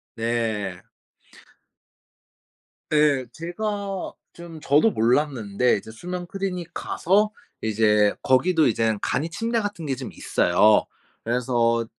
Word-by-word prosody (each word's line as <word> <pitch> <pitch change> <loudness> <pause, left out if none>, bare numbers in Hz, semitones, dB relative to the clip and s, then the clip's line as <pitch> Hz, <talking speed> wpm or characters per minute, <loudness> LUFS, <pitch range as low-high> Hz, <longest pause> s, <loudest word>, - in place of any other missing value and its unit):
네. 110 -5 -2 2.1
네 150 -4 +3
제가 195 +3 -4 0.2
좀 170 -2 -11
저도 150 +11 +4
몰랐는데 125 - +1
이제 110 - -9
수면 180 +9 -6
클리닉 180 -2 -4
가서 210 +4 +1 0.3
이제 105 -1 +3
거기도 160 +5 +3
이젠 110 -2 +1
간이 160 +4 -1
침대 230 +6 -1
같은 205 -6 -4
게 135 -2 -1
좀 130 0 -7
있어요. 105 +5 +3 0.4
그래서 115 -1 +1
135 Hz, 205 characters per minute, -24 LUFS, 115-175 Hz, 2.1 s, 저도